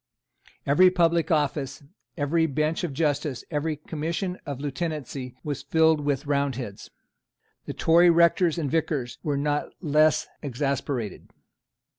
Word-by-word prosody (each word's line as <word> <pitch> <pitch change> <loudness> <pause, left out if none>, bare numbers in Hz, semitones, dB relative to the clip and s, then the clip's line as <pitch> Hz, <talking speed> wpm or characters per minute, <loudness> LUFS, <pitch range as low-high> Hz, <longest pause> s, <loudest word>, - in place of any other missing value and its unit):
Every 180 +7 +6
public 170 -2 +2
office, 145 -3 -1 0.3
every 160 +2 +1
bench 155 +3 -1
of 175 - -2
justice, 145 -2 -1
every 155 +1 -1
commission 170 +3 -4
of 140 -3 -4
Lieutenancy, 140 -3 -4
was 145 -3 -3
filled 160 -1 +3
with 145 0 -1
Roundheads. 135 -7 -2 0.8
The - - -4
Tory 170 +2 +5
rectors 170 0 +4
and 150 -5 -2
vicars 150 -6 -1
were 145 -2 -1
not 145 +1 -1
less 155 -1 +3 0.2
exasperated. 135 - -3
150 Hz, 120 wpm, -26 LUFS, 140-165 Hz, 0.8 s, Every